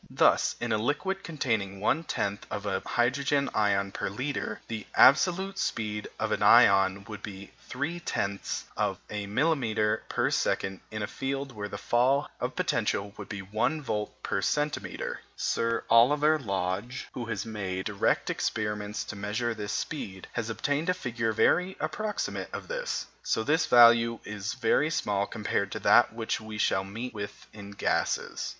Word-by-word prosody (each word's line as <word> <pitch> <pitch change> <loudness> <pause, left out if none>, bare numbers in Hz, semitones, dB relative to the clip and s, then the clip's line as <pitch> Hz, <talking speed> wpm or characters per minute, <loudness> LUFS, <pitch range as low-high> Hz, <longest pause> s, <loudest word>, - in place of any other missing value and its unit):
Thus, - - +3
in 120 - -2
a 110 - +2
liquid 150 - -1
containing 110 -11 -2
1/10th 105 -5 0
of 105 - -4
a 95 -2 0
hydrogen 140 +3 +1
ion 100 -2 +2
per - - -3
litre, 130 +1 -3
the 110 -2 -5
absolute 190 +7 +5
speed 105 -2 -2
of - - -1
an - - 0
ion 95 0 +6
would 105 -1 -7
be 100 -1 -8 0.2
3/10ths 140 - -2
of - - 0
a 105 -1 -3
millimetre 110 -4 +1
per - - +1
second 95 -1 0
in 110 -1 -4
a - - +1
field 135 +4 -3
where 105 -3 -5
the 100 - -6
fall 130 +7 +2
of - - -3
potential 100 0 0
would - - -9
be 100 -2 -5
1 110 +11 0
volt 105 -5 -2
per 100 - -1
centimetre. 150 +7 -2 0.2
Sir 115 0 0
Oliver 150 +6 +5
Lodge, 100 +1 -3
who 120 - -4
has 115 - -3
made 95 -4 -4
direct 105 -2 +1
experiments 105 -1 -2
to - - -7
measure 105 +4 -2
this 105 -2 -5
speed, 95 - -4
has 115 -1 -2
obtained 145 +8 -1
a 180 - +3
figure 115 -8 -2
very 180 - +2
approximate 215 -1 -3
to - - -4
this. - - -3 0.3
This 150 +9 +1
value 115 -1 +7
is 105 +2 -4
very 150 +3 +2
small 100 -9 0
compared 100 -2 -2
to - - -4
that - - +6
which 110 0 -2
we 110 -1 -7
shall 95 -2 +2
meet 115 +6 -6
with 100 -1 -7
in 100 -2 -9
gases. 100 - -1
110 Hz, 155 wpm, -28 LUFS, 100-140 Hz, 0.3 s, value